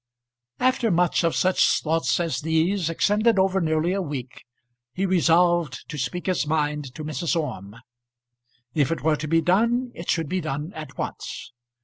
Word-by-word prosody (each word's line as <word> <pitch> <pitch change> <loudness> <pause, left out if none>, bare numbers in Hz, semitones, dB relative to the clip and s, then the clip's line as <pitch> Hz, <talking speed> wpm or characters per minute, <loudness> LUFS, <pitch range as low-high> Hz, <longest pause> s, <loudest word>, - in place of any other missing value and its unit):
After 255 -2 +2
much 175 -1 +2
of 165 - +1
such 185 0 +3
thoughts 155 -3 +1
as 170 -2 -1
these, 160 +3 +1
extended 210 +6 +2
over 190 0 +2
nearly 160 +2 +1
a 195 - -1
week, 140 -7 -6 0.5
he 195 - 0
resolved 175 -6 +2
to 150 - -6
speak 130 +8 -3
his 185 -5 0
mind 150 -3 -1
to 155 - -6
Mrs. 155 +3 -1
Orme. 105 - -5 1.0
If 150 -1 +1
it 165 - -3
were 155 -1 +2
to 155 +1 -5
be 165 +2 +3
done 235 +8 +2
it 170 - -9
should 165 -3 +1
be 185 +4 -1
done 155 +2 -4
at 155 -1 -9
once. - - -6
165 Hz, 165 wpm, -24 LUFS, 150-185 Hz, 1.0 s, such